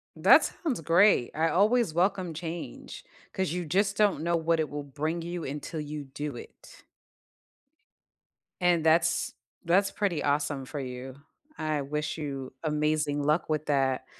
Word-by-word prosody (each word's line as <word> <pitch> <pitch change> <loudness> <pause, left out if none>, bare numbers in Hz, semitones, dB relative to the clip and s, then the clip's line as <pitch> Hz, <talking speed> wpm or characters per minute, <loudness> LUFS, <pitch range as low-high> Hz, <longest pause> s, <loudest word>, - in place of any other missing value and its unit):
That - - +7
sounds 275 - -3
great, 170 - +4
I 160 +1 +2
always 210 +2 +3
welcome 185 0 +1
change 170 - -7 0.3
'cause 190 -4 -1
you 180 0 -2
just 195 +5 +1
don't 200 -7 +2
know 170 0 +1
what 165 0 +1
it 155 - 0
will 145 +1 -5
bring 155 +4 -3
you 175 0 -5
until 150 +3 -5
you 150 -1 -5
do 145 0 -6
it. - - -13 1.8
And 175 -2 +3
that's 160 +2 +3 0.3
that's 190 +4 +3
pretty 190 -7 -1
awesome 145 -1 0
for 145 +3 -6
you. 130 0 -6 0.4
I 155 -2 -1
wish 150 +3 -3
you 135 -4 -5
amazing 150 -1 0
luck 155 +3 +1
with 155 0 -1
that, 135 -2 +1
155 Hz, 150 wpm, -28 LUFS, 145-175 Hz, 1.8 s, That